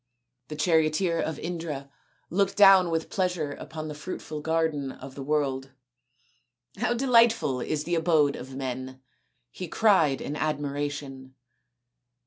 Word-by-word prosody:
The 155 - -6
charioteer 160 +2 +2
of 160 - -2
Indra 160 -5 -5 0.4
looked 195 +3 +1
down 195 -3 +7
with 165 -1 -2
pleasure 180 -6 -1
upon 155 +2 -7
the 150 - -5
fruitful 155 -1 -6
garden 160 -3 0
of 130 +1 -11
the 140 - -8
world. 135 -2 -1 0.5
" 125 0 -35
How 240 +1 +1
de 255 +3 -2
lightful 230 - +4
is 150 +2 -2
the 175 - -3
abode 160 -4 +3
of 130 +1 -9
men! 130 0 -5 0.2
" 125 -1 -49
he 185 - -6
cried 165 - +3
in 145 - -5
admiration. 145 -3 -3
150 Hz, 140 wpm, -27 LUFS, 135-170 Hz, 0.5 s, down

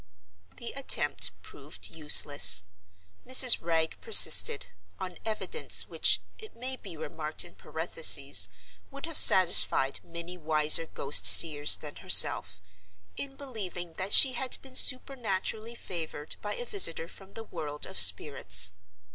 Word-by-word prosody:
The 235 - -11
attempt 275 -1 -1
proved - - -15
useless. 145 - +4 0.6
Mrs. 255 -1 +3
Wragge 160 -1 -6
persisted—on 420 - 0
evidence 225 - -3
which, - - -2 0.2
it 435 -1 -17
may 255 +2 -9
be 195 -9 -16
remarked 155 +1 -7
in 175 - -17
parenthesis, 150 - 0 0.4
would 275 +2 -12
have 330 -1 -12
satisfied 170 - +3
many 170 +1 -14
wiser 155 +1 -2
ghost 140 -1 0
seers 150 -3 +4
than - - -13
herself—in 90 - -1
believing 195 -11 -12
that 190 +2 -7
she 265 -2 +2
had 255 +1 -5
been 265 -1 -17
supernaturally 230 -4 0
favored 160 -7 -9
by 205 0 -9
a 245 - -10
visitor 165 -7 +1
from 195 +2 -17
the 225 - -11
world 150 -7 -10
of - - -4
spirits. 95 - +2
175 Hz, 120 wpm, -24 LUFS, 150-240 Hz, 0.6 s, useless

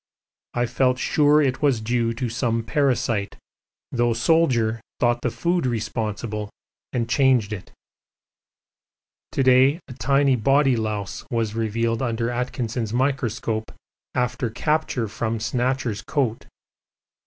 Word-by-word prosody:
I 120 0 +2
felt 125 +1 +1
sure 150 +2 +3
it 130 -2 0
was 140 -6 +3
due 115 +1 0
to 125 +2 -3
some 115 -1 -1
parasite, 115 -4 0 0.5
though 120 -1 +2
the - - -4
Soldier 120 -7 +2 0.2
thought 120 0 +2
the 125 - 0
food 170 +3 0
responsible 110 -2 -3 0.4
and 120 -2 -1
changed 125 -5 +3
it. 95 - -8 1.6
To 135 - +1
day 130 +4 +5
a - - -8
tiny 135 +3 +2
body 135 +3 +3
louse 110 0 -3
was 115 -3 -1
revealed 115 +1 -1
under 115 -1 -1
Atkinson's 120 -2 -2
microscope 120 -4 -1 0.4
after 125 0 0
capture 130 -1 0
from 115 +2 -2
'Snatcher's' 125 -1 -1
coat. 130 -7 -2
120 Hz, 120 wpm, -23 LUFS, 115-130 Hz, 1.6 s, day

